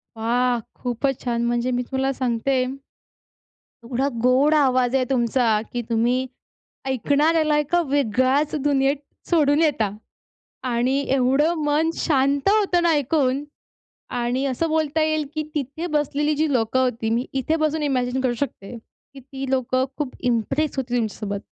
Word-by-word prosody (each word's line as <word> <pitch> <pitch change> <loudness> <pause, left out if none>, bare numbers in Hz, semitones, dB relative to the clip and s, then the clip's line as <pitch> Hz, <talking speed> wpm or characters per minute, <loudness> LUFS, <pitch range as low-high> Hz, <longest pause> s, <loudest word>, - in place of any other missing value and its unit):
वा! 240 +2 +1 0.2
खूपच 250 +2 -2
छान 235 -1 -1
म्हणजे 240 +1 0
मी 245 0 0
तुला 265 0 0
सांगते 255 +1 0 1.2
एवढा 255 +3 -1 0.2
गोड 265 +4 +4
आवाज 255 -3 +2
आहे 255 -1 +2
तुमचा, 235 -3 +2
की 240 - -1
तुम्ही 240 +3 +1 0.6
ऐकणाऱ्याला 300 +5 +2
एका 335 +4 +1
वेगळ्याच 275 +3 +1
दुनियेत 275 0 +2 0.3
सोडून 300 -2 +3
येता. 265 -10 +2 0.7
आणि 250 +1 +1 0.2
एवढं 270 +5 +2
मन 300 +2 +2
शांत 280 +2 +1
होतं 400 -4 +3
ना 340 - +3
ऐकून. 280 -2 +1 0.7
आणि 245 +2 -1
असं 275 +5 -1
बोलता 315 0 0
येईल, 310 -1 0
की 310 - -1
तिथे 295 +4 -3
बसलेली 295 +1 0
जी 310 -1 +1
लोकं 245 0 +1
होती, 230 -3 -1
मी 240 +3 0
इथे 270 +4 0
बसून 310 0 0
इमॅजिन 260 -2 0
करू 250 -2 0
शकते, 235 -4 -10
की 270 +4 -18
ती 270 0 -7
लोकं 260 0 +1
खूप 285 -4 -3 0.2
इम्प्रेस 275 +7 -1
होती 245 -2 -2
तुमच्यासोबत 210 -3 -3
265 Hz, 140 wpm, -22 LUFS, 245-295 Hz, 1.2 s, गोड